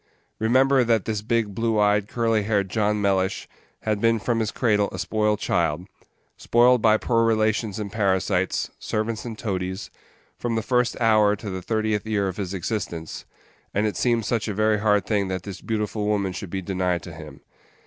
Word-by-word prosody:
Remember 130 +4 +4
that 115 -4 +1
this 110 -2 -2
big, 110 -1 0
blue 115 +1 0
eyed, 105 -1 +3
curly 115 -1 +1
haired 100 -3 0
John 105 0 +1
Mellish 95 -1 0 0.4
had 105 -2 -1
been 115 0 +3
from 115 +1 -1
his 110 -2 0
cradle 105 -5 +1
a - - -6
spoiled 105 -1 0
child 85 -4 0 0.5
spoiled 120 +1 +4
by 110 -1 +5
poor 115 0 +1
relations 110 -2 +1
and 105 -2 -5
parasites, 95 -2 0
servants 110 +1 -3
and 115 -2 -6
toadies, 95 -2 -4 0.5
from 120 -1 -2
the 110 - -1
first 125 +1 +1
hour 110 -3 +4
to 105 0 -7
the 95 0 -4
thirtieth 110 +1 -1
year 100 -3 0
of 95 - -5
his 95 -3 -3
existence 85 -4 -4 0.5
and 105 +2 +2
it 105 - -1
seemed 120 -3 +1
such 115 -2 -1
a 105 - -3
very 110 0 +2
hard 105 -1 +2
thing 100 -3 0
that 95 -1 -3
this 100 -2 -8
beautiful 105 -1 -2
woman 100 -3 0
should 95 0 -6
be 95 +1 -4
denied 90 -2 -1
to 85 - -9
him. 75 -2 -11
105 Hz, 185 wpm, -24 LUFS, 100-115 Hz, 0.5 s, by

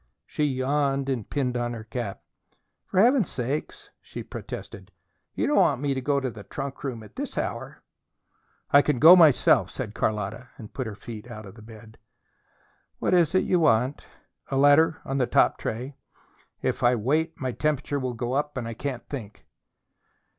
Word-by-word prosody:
She 150 - -1
yawned 135 0 0
and 120 -6 -3
pinned 130 -3 -1
on 120 0 -1
her 115 -2 -7
cap. 110 -2 -5 0.6
"For 185 - 0
Heaven's 240 - +4
sake," 135 +4 -3 0.3
she - - -8
protested. - - -8 0.4
"You - - 0
don't 295 - +1
want 180 -10 +4
me 140 0 0
to 130 - -3
go 140 +2 +1
to 130 -2 -3
the 110 - -10
trunk 135 +7 -7
room 125 -5 -4
at 105 - -15
this - - -5
hour!" - - -4 0.9
"I 145 - +8
can 145 -2 0
go 160 +8 +9
myself," 160 -7 +5
said - - -6
Carlotta, 110 +3 -2
and 110 - -11
put 130 -3 -4
her 105 - -6
feet 110 +2 -9
out 110 -2 -8
of 105 +3 -13
bed. 110 -1 -14 1.0
"What - - 0
is 175 0 +3
it 185 - +4
you 180 - +2
want?" 130 -3 +2 0.5
"A 135 - -1
letter 145 +3 +5
on 135 +1 -2
the 125 - +2
top - - +3
tray. 125 +6 -4 0.7
If - - -1
I 120 +1 +4
wait 155 +9 0
my 130 -3 -2
temperature 145 +1 -1
will 130 -2 -3
go 120 +1 -3
up 145 0 -1
and 120 -3 -3
I 115 - -4
can't 130 +1 -5
think." 110 -7 -8
130 Hz, 180 wpm, -26 LUFS, 115-145 Hz, 1.0 s, go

